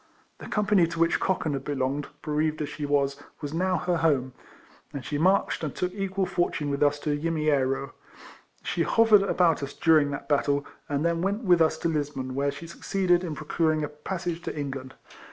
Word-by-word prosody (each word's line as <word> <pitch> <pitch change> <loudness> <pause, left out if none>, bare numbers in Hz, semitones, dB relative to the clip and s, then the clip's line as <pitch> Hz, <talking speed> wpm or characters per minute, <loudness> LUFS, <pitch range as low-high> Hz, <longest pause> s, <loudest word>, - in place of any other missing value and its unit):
The - - -9
company 205 -4 +3
to 165 0 -6
which 165 0 +3
Cochan 170 -5 0
had 135 -1 -3
belonged, 140 0 -2 0.2
bereaved 155 0 0
as 145 - -4
she 145 -1 -5
was, 140 0 +1 0.2
was 145 -1 -5
now 185 +2 +1
her 175 +1 0
home, 140 -6 +1 0.6
and 140 -3 -6
she 145 - -2
marched 185 0 +2
and 150 - -3
took 180 0 -2
equal 195 -1 -1
for 180 -1 0
tune 145 -1 -3
with 140 - -2
us 145 0 +3
to 150 -1 0
Yimiero. 145 -4 0 0.7
She 170 - -1
hovered 220 +3 +5
about 180 -5 +2
us 140 0 -5
during 155 -3 +4
that 140 0 -5
battle, 145 0 +1 0.2
and 145 +2 0
then 170 0 +1
went 200 +5 -1
with 175 -4 +4
us 160 - +3
to - - -1
Lisbon, 145 -5 -2
where 140 +2 0
she 140 +4 -9
succeeded 175 +1 0
in 165 -4 -4
pro 155 - -8
curing 155 0 +1
a 145 - -2
passage 170 +3 -4
to - - -5
England. 135 -2 -5
155 Hz, 200 wpm, -27 LUFS, 145-175 Hz, 0.7 s, hovered